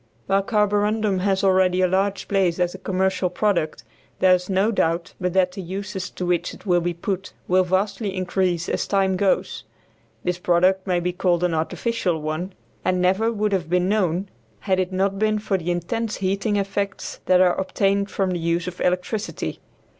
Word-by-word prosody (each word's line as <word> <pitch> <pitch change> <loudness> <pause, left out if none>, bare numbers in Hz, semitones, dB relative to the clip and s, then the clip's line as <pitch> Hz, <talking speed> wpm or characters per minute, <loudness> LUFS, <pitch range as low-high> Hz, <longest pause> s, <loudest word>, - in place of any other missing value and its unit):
While 195 +1 +2
carborundum 210 -1 +1
has 195 +1 +1
already 185 -1 +3
a 185 - +4
large 195 +2 0
place 190 -4 +1
as 175 0 +1
a - - -9
commercial 190 -1 0
product, 175 - 0 0.3
there 185 -1 +5
is 180 +1 0
no 195 +3 +2
doubt 170 -3 0
but 180 -1 -1
that 185 -1 +3
the 195 - -7
uses 190 +2 -5
to 180 - -5
which 175 -1 0
it - - -17
will 175 -3 +3
be 175 0 -2
put 190 +2 -4
will 185 +1 +4
vastly 190 +2 -1
increase 180 -2 0
as - - -1
time 195 -1 +2
goes 195 +1 0
on. - - -37
This 180 0 -1
product 185 +2 +2
may 180 -1 +2
be 175 +1 -2
called 180 -1 +1
an 175 -2 +1
artificial 175 +2 -1
one, 155 +5 -4 0.3
and 185 0 +1
never 190 +5 +2
would 210 -2 -1
have 185 -5 -1
been 180 +1 +2
known 190 -2 0 0.3
had 190 -1 +1
it 185 0 -1
not 195 +1 0
been 215 0 +2
for 210 -1 -1
the 175 -2 -2
intense 210 +6 -2
heating 195 +2 -1
effects 200 0 -3
that 185 -1 +5
are 180 -1 +5
obtained 195 +1 0
from 190 -1 -1
the 175 - -2
use 170 +1 -1
of 180 0 -6
electricity. 180 +4 -2
185 Hz, 190 wpm, -23 LUFS, 180-200 Hz, 0.3 s, there